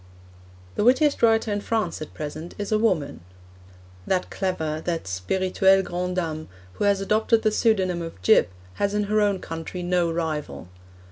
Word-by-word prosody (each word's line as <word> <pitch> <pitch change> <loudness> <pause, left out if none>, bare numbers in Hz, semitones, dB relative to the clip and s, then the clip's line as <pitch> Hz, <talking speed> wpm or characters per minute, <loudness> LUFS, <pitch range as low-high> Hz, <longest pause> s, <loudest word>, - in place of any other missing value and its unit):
The - - +2
wittiest 270 +5 +3
writer 225 -2 +3
in 205 - -2
France 210 -8 -2
at 155 - -8
present 155 +3 -6
is 205 0 -4
a 215 - +3
woman. 185 -11 0 0.9
That 185 -1 0
clever, 160 -5 -2
that 170 -2 -2
spirituelle 185 - +2
grande 180 0 -3
dame, 160 -3 -3 0.3
who 205 - -2
has 200 -1 +3
adopted 220 +3 +2
the 215 - +3
pseudonym 190 -6 +1
of 165 - -7
'Gyp,' 90 - +5 0.3
has 200 0 +1
in 210 - +1
her 210 +1 +1
own 205 -2 +2
country 165 +1 -6
no 175 -1 +1
rival. 150 - -4
185 Hz, 160 wpm, -24 LUFS, 165-210 Hz, 0.9 s, Gyp